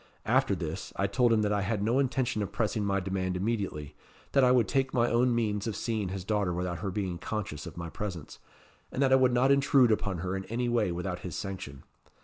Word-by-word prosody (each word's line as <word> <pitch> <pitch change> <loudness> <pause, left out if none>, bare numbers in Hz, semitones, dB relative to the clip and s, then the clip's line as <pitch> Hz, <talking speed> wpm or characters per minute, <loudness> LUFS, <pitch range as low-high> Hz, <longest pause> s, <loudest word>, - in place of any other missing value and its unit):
After - - +3
this, - - -5
I 100 - 0
told 120 +5 +2
him 110 -2 +3
that 105 0 +1
I 100 - +1
had 100 0 -1
no 115 +5 +2
intention 130 -4 0
of 100 - -3
pressing 110 -1 -1
my 100 -1 +1
demand 95 -1 -2
immediately; 95 -8 -2 0.4
that 135 - +4
I 125 - +6
would 125 -3 +4
take 135 -1 0
my 120 -1 +2
own 120 +1 +3
means 105 -2 -1
of 110 - -2
seeing 110 -5 -2
his 95 0 -5
daughter 105 -3 0
without 90 -1 -3
her 100 +2 -3
being 95 -3 -3
conscious 100 -10 -4
of - - -10
my 85 -1 -5
presence; 90 -7 -6 0.5
and - - -5
that 135 - +3
I - - +8
would 130 -1 +4
not 125 +3 +3
intrude 135 -3 +5
upon 100 -3 0
her 90 +1 -1
in 95 0 -4
any 120 +2 -2
way 115 -6 +1
without 90 +1 -3
his 90 - -6
sanction. 90 -9 -6
105 Hz, 230 wpm, -29 LUFS, 95-120 Hz, 0.5 s, I